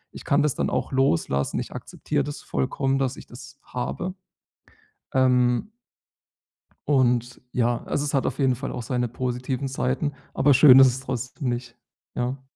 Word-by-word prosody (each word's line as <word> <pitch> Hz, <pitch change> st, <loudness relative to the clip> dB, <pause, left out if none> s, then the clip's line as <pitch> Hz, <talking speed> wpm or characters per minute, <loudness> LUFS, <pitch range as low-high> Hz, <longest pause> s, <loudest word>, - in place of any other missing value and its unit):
ich -, -, -10 dB
kann 145 Hz, +1 st, +3 dB
das 150 Hz, -3 st, +1 dB
dann -, -, -1 dB
auch -, -, -2 dB
loslassen. 85 Hz, -, +1 dB
Ich -, -, -5 dB
akzeptiere 145 Hz, -2 st, -3 dB
das 145 Hz, +1 st, -6 dB
vollkommen, 135 Hz, +1 st, -1 dB
dass 135 Hz, -1 st, -1 dB
ich -, -, -11 dB
das 125 Hz, +2 st, -12 dB
habe, 175 Hz, +9 st, -4 dB, 1.0 s
ähm 125 Hz, -, +2 dB, 1.2 s
und 125 Hz, -3 st, +1 dB
ja, 120 Hz, -1 st, 0 dB
also, 145 Hz, -, -1 dB
es 145 Hz, -, -3 dB
hat 135 Hz, -, +1 dB
auf -, -, -3 dB
jeden 130 Hz, -2 st, +3 dB
Fall 135 Hz, +3 st, -5 dB
auch -, -, -5 dB
seine 125 Hz, 0 st, -1 dB
positiven 125 Hz, +2 st, -3 dB
Seiten. 135 Hz, +3 st, -1 dB, 0.2 s
Aber 140 Hz, +2 st, +4 dB
schön 130 Hz, -1 st, +8 dB
ist 135 Hz, -, +9 dB
es 125 Hz, +1 st, -1 dB
trotzdem 130 Hz, +1 st, -4 dB
nicht, 120 Hz, -1 st, -5 dB, 0.4 s
ja. 125 Hz, +2 st, -2 dB
130 Hz, 165 wpm, -24 LUFS, 125-140 Hz, 1.2 s, ist